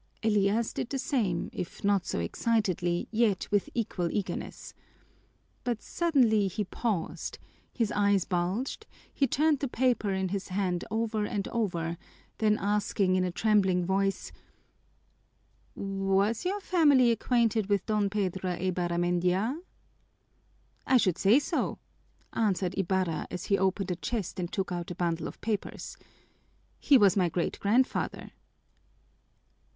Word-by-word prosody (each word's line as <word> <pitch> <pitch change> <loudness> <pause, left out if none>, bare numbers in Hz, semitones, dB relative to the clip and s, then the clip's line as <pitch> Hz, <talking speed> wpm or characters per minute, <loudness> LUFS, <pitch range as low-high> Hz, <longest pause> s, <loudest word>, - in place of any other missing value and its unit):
Elias 210 +1 +2
did - - -3
the 275 - -2
same, 215 -11 -1
if 175 - -6
not 200 -2 +2
so - - -2
excitedly, 180 - 0
yet 220 -4 +1
with 205 -1 +1
equal 185 -7 -1
eagerness. 200 -3 -4 0.9
But 240 -3 -2
suddenly 245 - +2
he 210 +3 -2
paused, 200 -3 -3 0.3
his 230 -4 -1
eyes 200 -3 +2
bulged, 195 - -2 0.3
he 275 - +2
turned 300 +3 +2
the 280 - -1
paper 245 -4 +1
in 190 -1 -1
his 195 0 -3
hand 185 -2 -1
over 220 -1 -1
and 200 -1 -3
over, 170 -7 -2 0.4
then 215 -1 +3
asked 205 0 -1
in 185 -1 +3
a 180 - -1
trembling 190 -3 +2
voice: 195 +1 0 1.4
"Was 195 - 0
your 400 +3 -1
family 290 -10 +4
acquainted 230 -3 +1
with 200 -2 +1
Don 210 -2 +1
Pedro 190 -3 -1
Eibarramendia?" 180 - 0 1.3
"I 260 - +5
should 185 -7 +1
say 205 +5 +5
so!" 290 - -1 0.6
answered 195 -5 0
Ibarra, 185 -4 -1
as 180 - -5
he 200 - +2
opened 190 0 0
a - - 0
chest 195 +1 -4
and 175 -1 -3
took 195 -2 -2
out 175 -1 -4
a 175 - -5
bundle 170 -2 -1
of - - -10
papers. 215 -2 -3 0.8
"He 285 - +5
was 205 -3 +5
my 180 -3 +2
great 170 +1 -2
grandfather." 240 +6 0
200 Hz, 135 wpm, -29 LUFS, 185-225 Hz, 1.4 s, I